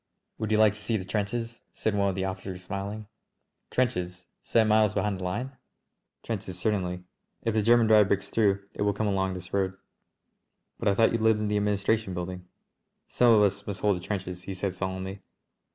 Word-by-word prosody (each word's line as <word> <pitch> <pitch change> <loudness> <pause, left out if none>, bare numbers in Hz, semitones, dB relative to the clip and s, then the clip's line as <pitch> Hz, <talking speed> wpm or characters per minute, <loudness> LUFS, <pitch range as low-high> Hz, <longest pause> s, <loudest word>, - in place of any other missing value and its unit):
"Would 110 - -2
you 110 - +3
like 110 -1 +5
to 105 - -10
see 110 +2 0
the 95 - -6
trenches?" 115 +3 -3
said 110 - -1
one 100 -1 +2
of 95 - -2
the 95 0 -1
officers, 95 -1 -5
smiling. 100 +3 -5 0.6
"Trenches? 90 -8 -1 0.2
Seven 110 -1 +2
miles 105 -1 +4
behind 100 -3 0
the - - -6
line?" 120 +9 -3 0.7
"Trenches 100 -5 -4
certainly. 90 -3 -1 0.4
If 115 - 0
the 110 - +2
German 120 +2 +5
drive 110 -2 +6
breaks 100 -1 -1
through 100 -3 +2
it - - -7
will 100 0 +2
come 110 +2 -2
along 95 -2 0
this 90 0 -8
road." 95 -1 0 1.0
"But - - -2
I 100 - +4
thought 115 +2 +4
you 115 - 0
lived 110 -1 +3
in 105 -1 -1
the 105 - +1
administration 105 -1 +1
building?" 90 +1 -5 0.6
"Some 120 -1 +4
of 105 -2 +6
us 100 0 0
must 100 -2 -4
hold 105 -2 +3
the 90 - -6
trenches," 90 -3 -4
he 95 +1 -6
said 95 0 -2
solemnly. 95 +1 -4
100 Hz, 200 wpm, -28 LUFS, 95-110 Hz, 1.0 s, drive